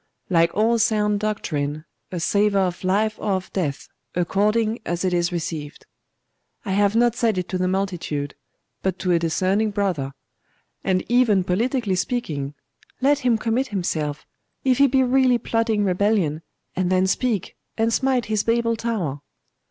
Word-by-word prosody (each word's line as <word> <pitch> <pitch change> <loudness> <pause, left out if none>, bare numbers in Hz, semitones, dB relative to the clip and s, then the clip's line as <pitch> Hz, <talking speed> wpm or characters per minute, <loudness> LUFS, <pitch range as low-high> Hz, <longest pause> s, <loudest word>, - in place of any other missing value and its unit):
'Like 170 -1 +4
all 230 +2 +3
sound 210 -2 +2
doctrine 155 -8 -2 0.3
a 180 - -3
savour 200 +3 +2
of 180 0 -3
life 210 +4 +1
or 205 - 0
of 185 -1 -4
death, 150 -7 -2 0.3
according 210 +6 +1
as 175 +2 -2
it 185 - +1
is 175 0 +1
received. 160 -4 -5 0.8
I 195 - -2
have 205 +2 +2
not 240 0 +3
said 230 -5 +1
it 180 -1 -2
to 185 - -2
the 185 - +1
multitude, 175 -7 -2 0.5
but 190 -1 -1
to 180 - -1
a 170 - +4
discerning 185 +6 +1
brother. 185 -10 -1 0.7
And 185 -1 +1
even 235 -5 +3
politically 220 +3 0
speaking 155 - -2 0.4
let 280 +2 +3
him 245 -4 +2
commit 235 +4 0
himself, 155 - -2 0.4
if 260 -1 +2
he 280 - +7
be 265 0 +3
really 255 -1 +4
plotting 225 -3 0
rebellion, 185 -5 +1 0.3
and 185 0 0
then 185 0 +3
speak, 210 0 -1 0.2
and 225 0 +1
smite 260 -2 +1
his 215 -1 0
Babel 230 +1 +1
tower. 195 - -2
200 Hz, 155 wpm, -23 LUFS, 175-230 Hz, 0.8 s, he